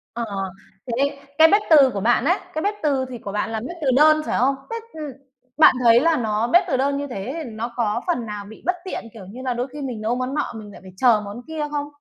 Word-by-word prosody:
Ờ, 235 - -2 0.6
thế 275 +4 0 0.2
cái 320 - +8
bếp 410 - +5
từ 285 -5 +7
của 200 - -2
bạn 240 +3 +2
ấy, 355 +6 +3 0.2
cái 315 - -2
bếp 410 +4 0
từ 275 -3 +1
thì 245 - -6
của 200 -3 -7
bạn 210 +2 -2
là 220 - -2
bếp 340 +10 -7
từ 280 - -1
đơn, 310 +2 +6
phải - - -1
không? 270 +2 +3
Bếp, 460 0 -4
ừm, 305 -3 -6 0.5
bạn 310 -4 +7
thấy 235 0 +7
là 325 +2 +2
nó 220 -1 0
bếp 350 +7 +5
từ 260 - 0
đơn 280 +1 +1
như 285 0 -3
thế 245 0 -5
thì 245 - -7
nó 230 +2 -5
có 230 -1 0
phần 250 -10 0
nào 210 -2 -6
bị 220 +2 -13
bất 360 - +1
tiện, - - -5
kiểu 210 -4 -11
như 220 +7 -10
là, 255 -2 -1
đôi 245 +2 -2
khi 295 - -7
mình 245 -5 -5
nấu 230 +3 0
món 255 +1 -3
nọ 295 - -2
mình 210 -2 -9
lại - - -13
phải 190 - -13
chờ 230 -2 +4
món 205 +4 -7
kia 310 -2 -3
không? 290 -1 -2
255 Hz, 275 wpm, -22 LUFS, 225-295 Hz, 0.6 s, cái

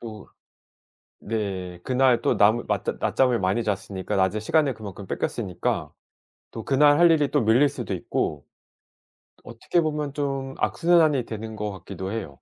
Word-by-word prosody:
또 110 -3 -9 0.9
네. 95 -5 -4
그날 130 -1 +2
또 - - +1
남 110 +3 +3
낮 - - -1 0.2
낮잠을 125 -4 +2
많이 95 +5 0
잤으니까 100 -3 -3
낮에 95 +3 +1
시간을 145 +4 +1
그만큼 100 -2 -9
뺏겼으니까 90 -1 -3 0.6
또 115 - -7
그날 145 +2 +4
할 175 0 +6
일이 150 -3 +3
또 145 - +2
밀릴 120 +7 +4
수도 120 -7 -6
있고 75 -4 -3 1.0
어떻게 115 +9 -2
보면 150 -2 -2
좀 135 -2 -3
악순환이 160 -7 +2
되는 110 0 -7
것 105 -1 -3
같기도 95 +1 -7
해요. 110 -10 -4
115 Hz, 290 characters per minute, -24 LUFS, 100-140 Hz, 1.0 s, 할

